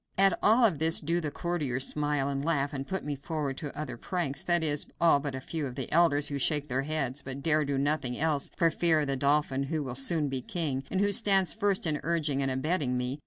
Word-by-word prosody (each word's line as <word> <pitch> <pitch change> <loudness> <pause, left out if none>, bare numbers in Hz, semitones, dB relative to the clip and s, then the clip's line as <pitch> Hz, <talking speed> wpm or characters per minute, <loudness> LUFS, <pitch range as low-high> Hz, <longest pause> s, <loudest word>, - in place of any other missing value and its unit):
At 195 -1 +3
all 230 +3 +5
of 175 -10 +2
this 160 +1 +4
do 170 +3 -1
the 155 - -2
courtiers 145 -6 -1
smile, 145 -2 -1
and 140 0 -3
laugh, 145 -3 0
and 135 -1 -5
put 190 -4 -4
me 150 -1 -3
forward 140 -1 -4
to 145 -2 -7
other 150 -5 -5
pranks; 140 -1 -2
that 175 -2 +2
is, 150 -2 0
all 165 -4 +4
but 140 -2 -5
a - - -4
few 150 +2 -4
of 125 - -8
the - - -5
elders, 150 -3 +3
who 140 -1 -3
shake 145 +1 +1
their 130 +2 0
heads, 140 -2 -2
but 135 +1 -7
dare 155 -1 +3
do 140 -1 -2
nothing 140 -3 -1
else 150 -2 0
for 165 -1 +3
fear 160 -2 +2
of 145 - -2
the 135 - -1
dauphin, 140 0 +1
who 155 +1 -2
will 130 -3 -5
soon 150 +4 0
be 135 -2 -3
king, 140 -2 -3
and 190 - -1
who 205 0 +2
stands 195 -3 +5
first 205 -4 0
in 150 -2 0
urging 155 -4 0
and 135 - 0
abetting 130 -1 -1
me. 125 +3 -3
150 Hz, 245 wpm, -28 LUFS, 135-165 Hz, -, all